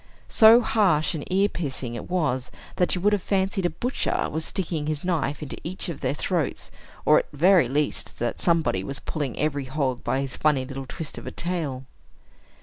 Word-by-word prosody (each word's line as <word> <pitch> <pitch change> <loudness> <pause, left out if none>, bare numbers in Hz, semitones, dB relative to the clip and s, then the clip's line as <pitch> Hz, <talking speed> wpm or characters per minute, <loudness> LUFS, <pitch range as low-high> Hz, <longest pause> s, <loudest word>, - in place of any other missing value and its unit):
So 225 +2 +8
harsh 190 -9 +2
and 155 -3 -4
ear 195 +2 +4
piercing 135 - -4
it 120 - -7
was, 140 -8 0 0.3
that 180 - +2
you 180 - -3
would 205 +2 +3
have 205 - +1
fancied 190 -1 0
a - - -2
butcher 250 +8 -1
was 160 +2 -2
sticking 165 -6 -2
his 155 -1 -2
knife 155 -5 -1
into 145 - -6
each 180 +1 -4
of 165 - -5
their - - 0
throats, 165 -1 -2 0.3
or, - - +6
at - - -6
the 145 - -14
very 175 -4 +5
least, 145 +2 -1
that 120 - -2
somebody 165 - +2
was 135 +6 -4
pulling 145 -4 -4
every 145 -2 -1
hog 130 -2 -2
by 135 - 0
his 135 -1 -5
funny 145 -4 +2
little 135 0 -7
twist 155 +3 -6
of - - -11
a - - -4
tail. 155 -7 -3
155 Hz, 200 wpm, -25 LUFS, 135-180 Hz, 0.3 s, So